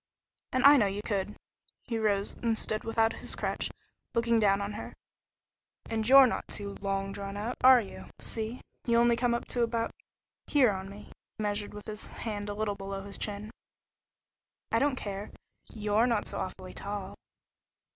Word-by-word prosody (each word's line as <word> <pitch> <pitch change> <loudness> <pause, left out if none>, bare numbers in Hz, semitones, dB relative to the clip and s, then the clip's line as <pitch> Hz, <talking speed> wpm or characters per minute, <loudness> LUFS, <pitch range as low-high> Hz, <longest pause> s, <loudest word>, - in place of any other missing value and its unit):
"And 255 +1 +2
I 285 +1 +10
know 210 -6 +4
you 200 +2 -3
could." 205 -1 -1 0.5
He 230 -2 -2
rose 205 -2 +1
and 230 -2 0
stood 215 0 -2
without 225 0 +2
his - - -5
crutch, - - -1 0.5
looking 230 0 +3
down 200 -2 +4
on 200 +1 -3
her. 210 - -7 1.0
"And 220 0 0
you're 270 0 +10
not 250 - -1
'too 200 -1 -6
long 195 0 -1
drawn 200 0 -5
out,' 225 +4 -3
are 255 -1 +9
you? 200 - -9
See? 225 +2 -3 0.3
You 235 0 +4
only 235 0 +5
come 240 0 +2
up 235 - -3
to 245 - 0
about 230 -1 0 0.6
here 265 -7 +5
on 190 0 -5
me." 200 +1 -11 0.3
He 215 - -3
measured 205 0 -2
with 210 - -8
his 215 0 -6
hand 205 -2 -5
a 205 - -3
little 215 -1 -1
below 195 0 -5
his 200 0 -5
chin. 210 +1 -4 1.2
"I 230 - +3
don't 285 0 +2
care. 205 -3 -5 0.4
You're 215 +2 +2
not 230 -4 +1
so - - -5
awfully 185 0 -5
tall." 200 -1 -4
210 Hz, 175 wpm, -30 LUFS, 200-235 Hz, 1.2 s, I